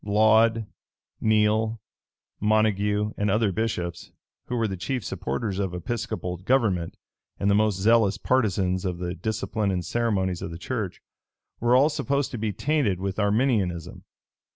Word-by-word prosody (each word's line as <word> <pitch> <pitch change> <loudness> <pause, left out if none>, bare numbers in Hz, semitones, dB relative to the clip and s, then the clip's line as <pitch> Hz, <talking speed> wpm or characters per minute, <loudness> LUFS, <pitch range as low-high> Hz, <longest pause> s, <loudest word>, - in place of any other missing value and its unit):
Laud, 110 +2 +4 0.6
Neile, 110 +1 +2 0.6
Montague, 105 0 +1
and 105 0 0
other 105 0 +2
bishops, 90 -5 -3 0.4
who 125 - -2
were 115 -2 +1
the 95 - -3
chief 105 +5 -3
supporters 95 - -3
of 95 -3 -2
Episcopal 90 -1 -3
government, 95 -4 0 0.4
and 100 0 +2
the - - +4
most 105 -1 +2
zealous 105 -1 +4
partisans 95 -6 +1
of 90 -3 -2
the 90 0 -3
discipline 110 -1 -2
and 90 -3 -1
ceremonies 95 -4 0
of - - -4
the 85 - -7
church, 105 0 -4 0.6
were 120 +1 +3
all 135 +3 +6
supposed 140 -2 -1
to 120 - -5
be 110 -1 -1
tainted 120 - 0
with 95 +1 -3
Arminianism. 105 - 0
105 Hz, 145 wpm, -25 LUFS, 95-115 Hz, 0.6 s, all